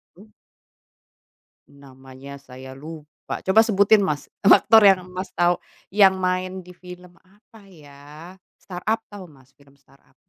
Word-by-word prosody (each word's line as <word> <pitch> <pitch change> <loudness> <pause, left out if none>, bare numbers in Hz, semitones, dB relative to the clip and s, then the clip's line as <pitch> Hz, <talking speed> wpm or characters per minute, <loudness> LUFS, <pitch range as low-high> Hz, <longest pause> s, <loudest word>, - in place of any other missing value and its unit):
Hmm? 205 +5 -18 1.4
Namanya 135 0 -14
saya 130 0 -13
lupa. 150 +3 -10
Coba 190 +3 +3
sebutin, 215 -1 +4
Mas, 155 -7 -3
aktor 220 +2 +5
yang 190 -2 +3
Mas 185 +1 -8
tahu 175 0 +1 0.3
yang 195 -1 +4
main 185 0 -3
di 180 - -15
film, 180 0 -15
apa 205 +2 -22
ya, 150 +1 -15 0.2
Start-Up, 215 +5 -5
tahu 200 -3 -11
Mas 135 -4 -22
film 140 0 -25
Start-Up? 140 0 -29
180 Hz, 130 wpm, -22 LUFS, 140-190 Hz, 1.4 s, aktor